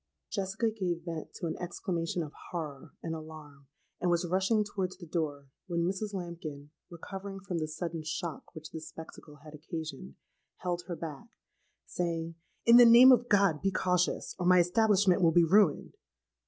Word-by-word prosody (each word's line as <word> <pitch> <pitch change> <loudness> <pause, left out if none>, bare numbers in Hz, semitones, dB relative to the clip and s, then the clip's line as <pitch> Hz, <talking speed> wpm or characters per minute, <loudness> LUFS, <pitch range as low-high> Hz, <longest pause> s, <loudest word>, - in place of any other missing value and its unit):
"Jessica 215 +3 -1
gave 180 -6 -3
vent 165 -3 -5
to - - -5
an 160 - -2
exclamation 175 -1 -3
of 150 - -9 0.2
horror 155 -3 -6
and 165 - -3
alarm, 155 -3 -10 0.3
and 180 - 0
was 175 +1 +1
rushing 195 +5 +2
towards 190 -3 -4
the 180 - -10
door, 150 -4 -3 0.2
when 170 -2 -1
Mrs. 195 +3 -2
Lambkin, 165 -6 -7 0.2
recovering 195 +3 -8
from 185 -3 -4
the 155 - -2
sudden 165 +1 -4
shock 160 +1 -5
which 155 0 -9
this 160 0 -7
spectacle 160 -1 -11
had 155 -1 -12
occasioned, 155 - -7 0.4
held 175 -1 -3
her 175 - -4
back, 155 +3 -7 0.6
saying, 165 -1 -3 0.3
'In 235 +1 +8
the 245 - +10
name 240 +3 +9
of 245 -1 +3
God 195 -7 +3
be 195 - +2
cautious; 180 -1 0
or 180 - 0
my 180 0 +6
establishment 190 +1 +3
will 165 -2 +5
be 170 +1 +5
ruined!' 190 -2 +3
175 Hz, 170 wpm, -30 LUFS, 160-190 Hz, 0.6 s, the